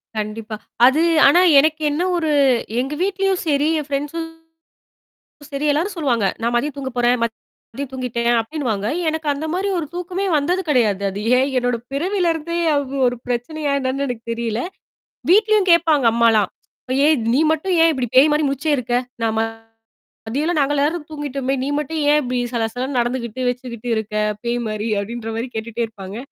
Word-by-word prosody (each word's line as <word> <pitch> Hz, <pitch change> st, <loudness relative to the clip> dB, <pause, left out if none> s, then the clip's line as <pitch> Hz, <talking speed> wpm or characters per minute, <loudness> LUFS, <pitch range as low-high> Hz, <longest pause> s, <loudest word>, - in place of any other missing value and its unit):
கண்டிப்பா. 215 Hz, +1 st, -4 dB, 0.3 s
அது 280 Hz, +5 st, +4 dB, 0.3 s
ஆனா 350 Hz, +6 st, +6 dB, 0.2 s
எனக்கு 310 Hz, +2 st, +1 dB
என்ன 305 Hz, +4 st, -1 dB, 0.2 s
ஒரு 320 Hz, -2 st, 0 dB, 0.5 s
எங்க 270 Hz, +3 st, -2 dB
வீட்லயும் 390 Hz, -1 st, 0 dB
சரி 290 Hz, 0 st, +2 dB
என் 295 Hz, -, -6 dB
ஃப்ரெண்ட்ஸும் 295 Hz, +4 st, -3 dB, 1.3 s
சரி 285 Hz, +2 st, -2 dB
எல்லாரும் 345 Hz, +8 st, -1 dB
சொல்லுவாங்க. 245 Hz, -9 st, 0 dB, 0.2 s
நான் 235 Hz, +1 st, 0 dB
மதிய 290 Hz, +5 st, 0 dB
தூங்க 265 Hz, -1 st, -4 dB
போறேன். 245 Hz, +1 st, +3 dB
மதியம் 230 Hz, +3 st, -6 dB
தூங்கிட்டேன் 240 Hz, -2 st, -1 dB
அப்டின்னுவாங்க. 225 Hz, -6 st, -3 dB, 0.2 s
எனக்கு 315 Hz, 0 st, -3 dB
அந்த 295 Hz, +3 st, -4 dB
மாரி 385 Hz, +3 st, -1 dB
ஒரு 310 Hz, -, -3 dB
தூக்கமே 360 Hz, +2 st, -3 dB
வந்தது 355 Hz, +6 st, 0 dB
கிடையாது. 215 Hz, -7 st, +2 dB
அது 200 Hz, +2 st, -6 dB, 0.2 s
ஏன் 265 Hz, +2 st, +2 dB
என்னோட 245 Hz, -1 st, 0 dB, 0.2 s
பிறவிலருந்தே 340 Hz, 0 st, -1 dB, 0.2 s
அது 275 Hz, -1 st, -2 dB
ஒரு 245 Hz, -, -3 dB
பிரச்சனையா 280 Hz, +5 st, -2 dB
என்னன்னு 265 Hz, +2 st, -1 dB
எனக்கு 230 Hz, -2 st, -5 dB
தெரியல. 230 Hz, 0 st, -2 dB, 0.7 s
வீட்லயும் 425 Hz, -1 st, +4 dB
கேட்பாங்க 315 Hz, -5 st, +3 dB
அம்மாலாம். 225 Hz, -4 st, +3 dB, 0.3 s
அப்ப 255 Hz, -, -5 dB
"ஏன் 300 Hz, -7 st, +3 dB
நீ -, -, +3 dB
மட்டும் 360 Hz, +4 st, -1 dB
ஏன் 330 Hz, -, +6 dB
இப்படி 255 Hz, -4 st, -2 dB
பேய் 275 Hz, +4 st, +8 dB
மாரி 300 Hz, 0 st, +2 dB
முடிச்சே 285 Hz, +3 st, -1 dB
இருக்க? 240 Hz, -1 st, -2 dB, 0.3 s
நான் 225 Hz, -1 st, +1 dB
ம -, -, +3 dB, 0.9 s
மதியல்லாம் 305 Hz, +8 st, -1 dB
நாங்க 285 Hz, +1 st, +2 dB
எல்லாரும் 295 Hz, +3 st, 0 dB
தூங்கிட்டோமே! 275 Hz, -3 st, -3 dB
நீ -, -, -2 dB
மட்டும் 310 Hz, +2 st, -3 dB
ஏன் 300 Hz, -, +5 dB
இப்படி 250 Hz, -1 st, -2 dB, 0.2 s
சல 230 Hz, -2 st, 0 dB
சல 250 Hz, +1 st, -2 dB
நடந்துகிட்டு 240 Hz, 0 st, -2 dB
வச்சுக்கிட்டு 245 Hz, -2 st, -6 dB
இருக்க, 215 Hz, -1 st, -4 dB, 0.3 s
பேய் 240 Hz, +1 st, -1 dB
மாரி" 215 Hz, +1 st, -3 dB
அப்டின்ற 225 Hz, +2 st, -5 dB
மாரி 235 Hz, +3 st, -3 dB
கேட்டுட்டே 230 Hz, +1 st, -3 dB
இருப்பாங்க. 200 Hz, -2 st, -9 dB
270 Hz, 165 wpm, -20 LUFS, 235-310 Hz, 1.3 s, பேய்